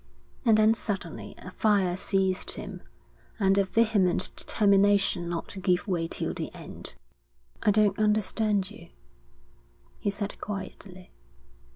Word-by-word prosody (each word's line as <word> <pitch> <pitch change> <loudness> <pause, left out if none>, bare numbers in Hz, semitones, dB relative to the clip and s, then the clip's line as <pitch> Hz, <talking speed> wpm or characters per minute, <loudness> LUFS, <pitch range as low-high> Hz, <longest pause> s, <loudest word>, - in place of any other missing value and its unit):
And 225 -2 +6
then 215 +1 +5
suddenly 195 -7 -5
a 185 - -10
fire 195 -4 +2
seized 190 0 0
him, - - -7 0.6
and 195 -1 +3
a 200 - +3
vehement 200 -4 +2
determination 200 -4 +3
not 170 -1 -3
to 195 - -7
give 180 0 +1
way 170 -4 0
till - - -2
the - - -5
end. - - -9 0.7
'I - - +3
don't 205 -1 +3
understand 210 -1 +1
you,' 220 - -13 1.1
he 205 - -1
said 200 0 -5
quietly. 190 -2 -7
200 Hz, 130 wpm, -27 LUFS, 185-210 Hz, 1.1 s, And